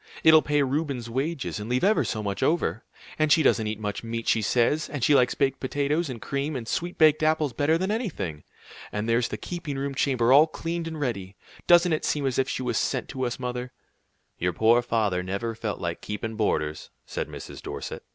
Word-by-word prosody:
It'll 160 -1 +8
pay 145 -1 +1
Reuben's 135 -4 -2
wages, 135 -1 -2
and 105 +2 -6
leave 125 +1 0
ever 210 +3 +4
so 110 -2 -3
much 100 -1 -3
over! 155 -7 +1 0.4
And 155 -1 +2
she 160 - +6
doesn't 110 -5 +3
eat 105 0 -3
much 105 0 -4
meat, 115 0 -4
she 110 - +3
says, 125 +8 +1
and 145 -5 -4
she 150 - +4
likes 125 -3 +4
baked 135 -1 +1
potatoes 145 +4 -1
and 125 -3 -6
cream 140 +5 -3
and 120 -3 -5
sweet 175 +7 -3
baked 155 -1 +5
apples 155 -3 +2
better 145 +6 +2
than 190 +4 -1
anything. 160 - -3 0.5
And 105 +1 -3
there's 115 +1 +2
the - - -5
keeping 170 -6 -5
room 140 +1 -2
chamber 130 -3 +2
all 150 +3 +7
cleaned 165 +1 -4
and 160 -1 -5
ready. 100 -9 -3 0.3
Doesn't 175 -1 +6
it 155 - -1
seem 145 -2 0
as 130 -1 0
if 135 - +1
she 130 - -3
was 120 -3 0
sent - - -1
to 130 -2 -2
us, 120 - -4
mother?" 125 0 -4 0.7
"Your 90 +1 0
poor 115 +6 +4
father 110 -6 0
never 100 +5 -3
felt 110 -2 -4
like 85 -1 -4
keepin' 110 +2 -4
boarders," 75 -8 -1 0.2
said - - -4
Mrs. - - -9
Dorset. - - -6
130 Hz, 210 wpm, -26 LUFS, 115-155 Hz, 0.7 s, It'll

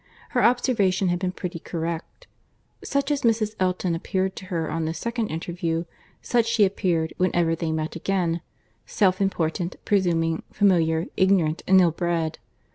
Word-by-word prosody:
Her 245 -3 +1
observation 205 -7 +2
had 175 0 0
been 185 -1 -1
pretty 180 -1 -5
correct. 170 - -5 0.6
Such 280 +1 -1
as 290 - 0
Mrs. 220 -2 +1
Elton 185 -1 0
appeared 185 +3 -1
to - - -7
her 170 -3 -2
on 165 0 -1
this 160 +1 -3
second 235 -1 -2
interview, 165 0 -3 0.4
such 235 -2 +2
she 230 -3 +4
appeared 175 -4 0
whenever 175 -2 +2
they 165 -1 -2
met 160 +1 -2
again,—self 185 +2 -1
important, 175 -2 -1
presuming, 165 -5 +1
familiar, 165 -4 +2
ignorant, 185 -4 +3
and 190 0 +7
ill 175 -2 +4
bred. 165 -1 -1
180 Hz, 145 wpm, -24 LUFS, 165-195 Hz, 0.6 s, and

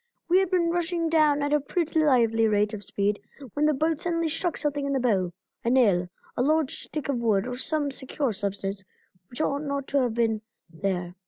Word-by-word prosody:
We 360 +2 +5
had 385 -2 +1
been 345 -2 +2
rushing 340 -1 0
down 305 -3 +3
at 290 +1 0
a 300 - +4
pretty 315 +2 0
lively 230 -5 +4
rate 210 0 +2
of 205 -1 -5
speed 200 +1 -1 0.3
when 300 +1 +2
the 305 - +3
boat 315 +2 0
suddenly 335 -2 -1
struck 345 +2 -1
something 290 -1 -1
in 280 - 0
the 270 - +1
bow, 195 -8 +1 0.3
a 235 - +1
nail, 200 -9 +3 0.3
a - - 0
lodged 305 +1 +1
stick 305 -3 -4
of 280 -3 0
wood 215 -4 +2
or 250 0 -4
some 290 +2 -1
secure 265 -1 -2
substance 200 -1 -3 0.5
which 245 - -5
ought 280 -2 0
not 280 -2 -3
to 280 -1 +2
have 240 -3 0
been 225 -2 +1 0.3
there. 180 0 -2
275 Hz, 210 wpm, -26 LUFS, 215-310 Hz, 0.5 s, We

